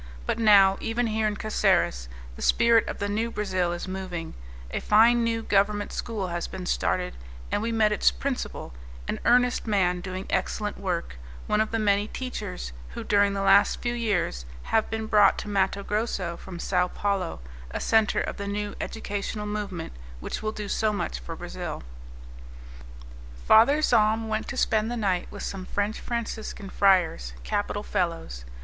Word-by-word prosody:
But - - -1
now 200 -3 +6
even 235 +2 0
here 220 -1 0
in 210 - -1
Caceres - - +1 0.3
the - - -10
spirit 235 0 +4
of - - -4
the 205 - -2
new 220 +3 -1
Brazil 185 -5 -1
is 175 +1 -4
moving; 185 -3 -5 0.4
a - - -1
fine 235 +3 +5
new 230 -1 0
government 205 0 +1
school 210 -5 -3
has 170 0 -3
been 185 -1 -7
started, - - 0 0.4
and - - +1
we 230 +1 -1
met 220 -2 +3
its 210 - +4
principal, 270 - -4 0.3
an - - -2
earnest 245 +1 +3
man 180 -4 +2
doing 185 +1 -5
excellent 205 +2 -2
work, 175 - -3 0.3
one 210 - +2
of 220 - 0
the 225 - -1
many 205 -1 +2
teachers 140 - -5 0.2
who, - - -5
during 200 -1 +3
the 195 - -1
last 195 +1 +5
few 240 0 -1
years, 205 - -1 0.2
have 220 - +1
been 220 0 -3
brought 210 -2 +5
to - - -5
Matto 200 -1 0
Grosso 200 -5 -2
from 180 +1 -9
Sao 180 +1 +1
Paulo, 195 -2 -2 0.3
a - - -4
centre 220 -1 +3
of - - -4
the 200 - -4
new 205 0 -3
educational 210 -1 -4
movement 205 - -4 0.3
which - - -5
will 215 0 -1
do 210 -1 -6
so 215 +1 +1
much 120 - -3
for - - -7
Brazil. - - -6 1.6
Father 280 +8 +6
Zahm 220 -3 +3
went 215 0 -2
to 275 - -5
spend 220 -2 +2
the 240 - -3
night 190 -5 0
with 205 - -8
some 195 -1 -4
French 205 +2 -1
Franciscan 220 -4 -5
friars, 175 - +2
capital 205 - -2
fellows. 165 - -2
205 Hz, 170 wpm, -26 LUFS, 185-220 Hz, 1.6 s, now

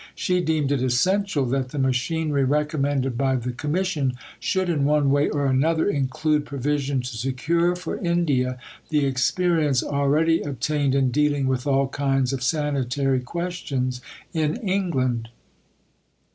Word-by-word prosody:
She 180 0 0
deemed 155 -4 0
it 140 -3 +1
essential 150 +5 +1
that 130 0 -1
the 145 - -7
machinery 140 +3 0
recommended 140 -2 0
by 135 -1 +2
the 125 0 -2
Commission 150 0 -1 0.3
should 190 -1 0
in 155 -5 0
one 145 -1 +3
way 145 +1 +3
or 145 -1 -1
another 155 +5 +2
include 150 -1 0
provision 140 -1 -1
to 125 -1 -6
secure 155 +9 0
for 180 -2 -5
India 150 -8 0 0.3
the 150 -2 +2
experience 145 +1 +1
already 150 +4 +2
obtained 145 0 -1
in 135 -2 +2
dealing 145 0 +1
with 130 0 -1
all 135 -1 +2
kinds 135 -1 0
of 135 - -3
sanitary 135 -2 0
questions 135 -4 -3 0.3
in 155 -2 0
England. 130 -12 0
140 Hz, 135 wpm, -24 LUFS, 130-160 Hz, 0.3 s, one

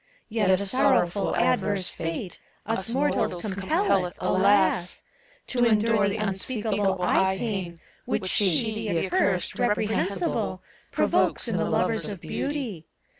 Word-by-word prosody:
Yet 215 -3 +1
a 190 - +5
sorrowful 200 -2 +2
adverse 200 -3 +1
fate, 165 +3 -5 0.3
Us 220 -2 -2
mortals 235 -8 0
compelleth, 195 - 0
alas! 190 -1 +2 0.4
To 245 -2 0
endure 220 -2 +3
the 200 - -3
unspeakable 205 -1 -1
eye 190 +1 +2
pain 190 -6 -4 0.3
Which - - -2
She, 200 +3 +2 0.2
the 170 -2 0
accurst, 185 -1 0
reprehensible, 215 - -1 0.3
Provokes - - +1
in - - 0
the - - 0
lovers - - 0
of - - -6
Beauty. 250 - -4
200 Hz, 120 wpm, -25 LUFS, 185-225 Hz, 0.4 s, a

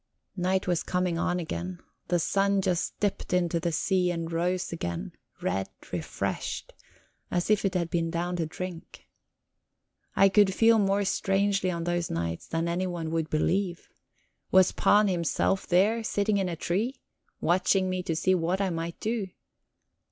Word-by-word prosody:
Night 185 0 0
was 175 -2 +1
coming 180 -2 -1
on 180 +1 0
again; 175 +2 -4 0.3
the 175 - +2
sun 200 +4 +2
just 180 -2 -1
dipped 205 -2 -1
into 175 -2 +2
the 170 0 -1
sea 180 +3 +1
and 165 -1 -3
rose 180 +2 -1
again, 85 - -4 0.3
red, 95 +1 0 0.3
refreshed, - - -3 0.6
as 175 +3 0
if 210 - +3
it 195 -2 0
had 170 -2 -1
been 165 -1 0
down 175 +1 -2
to 165 -2 -1
drink. 180 +1 -8 1.1
I 195 - +6
could 195 -1 +4
feel 225 +1 +5
more 200 0 +2
strangely 195 0 +1
on 170 -2 -2
those 175 0 -1
nights 85 0 -3
than 165 +1 -1
anyone 170 -2 -2
would 165 -1 -1
believe. 175 +3 0 0.6
Was 185 -1 +5
Pan 210 0 +4
himself 180 +1 0
there, 210 +6 +3
sitting 205 -1 +1
in 190 -2 0
a 170 - -3
tree, 205 - -1 0.4
watching 185 +2 +2
me 185 0 -1
to 165 -2 -2
see 185 +3 +2
what 180 +1 0
I 195 -2 0
might 165 0 -4
do? 220 -2 -1
180 Hz, 160 wpm, -28 LUFS, 170-195 Hz, 1.1 s, I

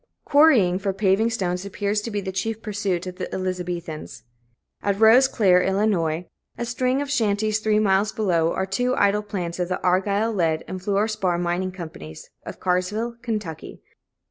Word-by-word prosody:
Quarrying 255 - +5
for 195 -1 -1
paving 195 +3 +2
stones 180 -5 -2
appears 205 +1 -2
to 230 - -5
be 205 -2 -2
the 190 -1 -4
chief 220 +4 -3
pursuit 200 -4 -2
of 180 0 -7
the - - -5
Elizabethans. 180 -7 -5 0.6
At 200 0 -1
Rose 230 +4 +7
Clare, 185 -7 +3
Ill., 190 +1 0 0.3
a 165 +8 -6
string 255 +3 0
of 285 - -6
shanties 215 -3 +1
three 215 -1 +1
miles 205 0 +2
below, 170 -7 +1
are 190 - -1
two 245 +7 0
idle 200 +1 +2
plants 185 -5 -5
of 180 0 -1
the 185 - -1
Argyle 200 +5 +1
Lead 165 -5 0
and 185 0 -6
Fluor 200 +2 +1
Spar 195 -5 -1
Mining 175 +2 -1
Co. 180 -3 -7
Carrsville, 180 - -4 0.4
Ky. - - -11
195 Hz, 165 wpm, -23 LUFS, 180-215 Hz, 0.6 s, Rose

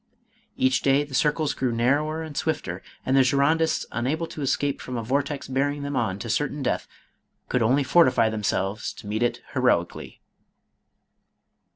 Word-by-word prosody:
Each 130 0 +2
day 140 +1 +3
the 145 -2 -11
circles 150 +2 +1
grew 130 -2 -1
narrower 145 +7 +1
and 155 -2 -8
swifter, 95 - -2 0.2
and 130 - +2
the 135 - +6
Girondists 150 +5 +2
unable 140 +8 -1
to 155 - -8
escape 140 +1 0
from 125 -1 -5
a 115 - -3
vortex 140 +4 -1
bear 135 +2 +1
ing 145 0 -5
them 140 0 -3
on 95 -6 0
to 115 - -6
certain 145 +5 -1
death, - - -1 0.6
could 125 - +1
only 130 +6 +3
fortify 130 -6 +4
them 110 -1 -3
selves 100 +1 -1
to - - -13
meet 105 +2 -2
it 120 - 0
heroically. - - 0
135 Hz, 170 wpm, -25 LUFS, 120-145 Hz, 0.6 s, the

